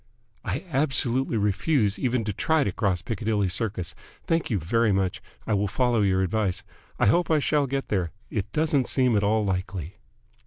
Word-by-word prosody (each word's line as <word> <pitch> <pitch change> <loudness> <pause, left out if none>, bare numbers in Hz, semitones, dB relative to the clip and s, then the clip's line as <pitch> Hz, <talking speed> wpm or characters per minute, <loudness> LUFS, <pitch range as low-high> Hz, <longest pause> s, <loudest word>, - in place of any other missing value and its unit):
"I - - -3
absolutely 130 -3 +1
refuse 105 +2 +1
even 125 -2 0
to 105 -1 -2
try 160 +9 +2
to 100 - -1
cross 90 -2 -1
Piccadilly 105 -1 -1
Circus. 95 -2 -3 0.3
Thank 165 -1 0
you 110 - +1
very 110 +7 +1
much. 95 -2 0 0.2
I 110 - 0
will 100 0 +1
follow 120 +2 +1
your 95 -1 +2
advice. 95 -1 -1 0.3
I - - +2
hope 170 - +3
I 160 - +4
shall 145 -1 +1
get 135 +1 -3
there. 90 -5 0 0.2
It 105 -4 -3
doesn't 150 -4 +1
seem 125 -4 +2
at 100 - +3
all 105 +1 +2
likely." 95 -1 -3
110 Hz, 180 wpm, -26 LUFS, 95-130 Hz, 0.3 s, I